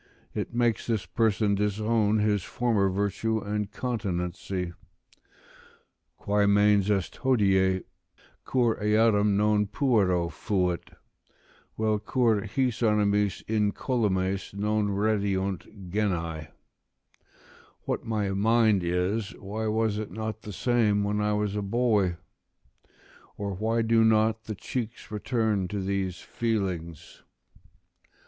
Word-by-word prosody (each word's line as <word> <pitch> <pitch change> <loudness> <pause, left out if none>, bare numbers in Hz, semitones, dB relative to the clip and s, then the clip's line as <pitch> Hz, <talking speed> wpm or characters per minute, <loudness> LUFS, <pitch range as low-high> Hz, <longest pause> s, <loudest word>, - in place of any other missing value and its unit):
It - - -3
makes 120 -1 0
this 110 -4 -1
person 110 -3 +1
disown 105 +1 +1
his 105 -1 +2
former 110 -2 +1
virtue 100 +3 -1
and 105 -1 -3
continency: 90 -6 -3 1.4
"Quae 100 0 +1
mens 105 0 +4
est 100 -3 -1
hodie, 95 -7 +2 0.6
cur 120 -3 +1
eadem 105 -1 +3
non 105 0 +2
puero 100 -9 +2
fait? 90 -5 -1 0.9
Vel 110 -1 +1
cur 110 -1 +1
his 125 +1 -1
animis 105 -2 +2
incolumes 100 -3 0
non 105 +1 0
redeunt 100 -2 -1
genae?" 85 -7 -1 1.3
["What - - -3
my 105 -3 -1
mind 110 -1 +3
is, 95 +6 -1
why 110 +3 -4
was 110 -1 0
it 110 - -5
not 110 0 -5
the 105 - -8
same, 105 -1 +2
when 105 +1 0
I 105 0 +1
was 105 -1 -1
a 105 - -1
boy? 100 -4 +1 1.2
or 100 -1 -3
why 110 +4 0
do 115 0 +4
not 110 0 +2
the 110 - -5
cheeks 115 +2 -5
return 110 -3 0
to 100 +2 -4
these 95 -1 -2
feelings?" 95 -9 -3
105 Hz, 110 wpm, -27 LUFS, 100-110 Hz, 1.4 s, mens